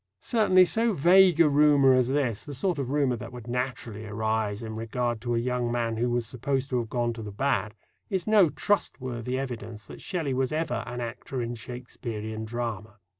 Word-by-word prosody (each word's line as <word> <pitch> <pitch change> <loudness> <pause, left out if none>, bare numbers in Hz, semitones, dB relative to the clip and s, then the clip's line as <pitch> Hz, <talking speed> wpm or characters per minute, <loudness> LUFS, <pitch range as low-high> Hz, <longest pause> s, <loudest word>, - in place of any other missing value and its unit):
Certainly, 185 - +4
so 225 +5 +1
vague 180 +1 +5
a 165 - +7
rumour 145 -2 +5
as 130 -1 +3
this 130 -5 0
the 145 - -7
sort 175 +3 0
of 130 -3 -2
rumour 140 -3 +1
that - - -8
would 120 -3 -9
naturally 120 -3 -4
arise 110 0 -1
in 110 -1 -6
regard 115 +1 -2
to 120 -1 -1
a - - +1
young 120 0 -1
man 115 -2 -1
who 120 +2 +1
was 120 -1 0
supposed 135 +4 -2
to 125 - +2
have 115 -2 -4
gone 120 -1 0
to 115 - -8
the 105 -1 -6
bad 110 -2 -1 0.3
is 190 -3 -1
no 210 -6 +5
trustworthy 130 - -1
evidence 115 -5 -6
that - - -11
Shelley 160 -8 -2
was 130 0 0
ever 155 -6 -1
"an 120 +1 -5
actor 120 +2 -5
in 120 0 -2
Shakespearean 115 -2 -6
drama." 110 -3 -5
125 Hz, 195 wpm, -27 LUFS, 115-140 Hz, 0.3 s, a